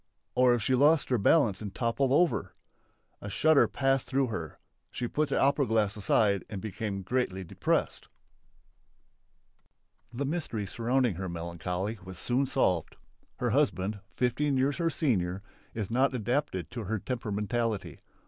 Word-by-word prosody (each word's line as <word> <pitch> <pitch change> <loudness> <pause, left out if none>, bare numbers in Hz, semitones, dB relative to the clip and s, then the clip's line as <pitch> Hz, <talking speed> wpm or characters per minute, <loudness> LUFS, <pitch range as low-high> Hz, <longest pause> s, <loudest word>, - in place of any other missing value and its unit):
Or 125 -1 +5
if 115 - -3
she 130 - +1
lost 145 +4 +4
her 125 -3 +2
balance 110 - +3
and 100 -3 -6
toppled 125 +3 0
over! 170 +4 +2 0.7
A 105 - -6
shudder 155 +8 +4
passed 135 -1 0
through 135 -1 +1
her. 85 -9 -5 0.3
She 120 - -3
put 155 +4 0
the - - +1
opera 140 0 +3
glass 110 -2 +1
aside 100 -1 +2
and 100 -3 -5
became 100 -1 -4
greatly 95 -3 -1
depressed. 85 - -1 2.0
The 130 +4 -3
mystery 135 -9 -3
surrounding 120 +3 +1
her 95 -1 -4
melancholy 90 +5 -4
was 95 -1 -9
soon 130 +7 0
solved. 95 - 0 0.4
Her - - -1
husband, 100 +3 +1 0.2
fifteen 130 +3 +1
years 135 +2 +1
her 170 -1 +1
senior, 100 - 0 0.3
is 110 -2 -3
not 130 +2 +2
adapted 120 - -2
to 115 -4 -5
her 110 +4 -1
temperamentally. 110 -1 -2
115 Hz, 145 wpm, -29 LUFS, 100-135 Hz, 2.0 s, Or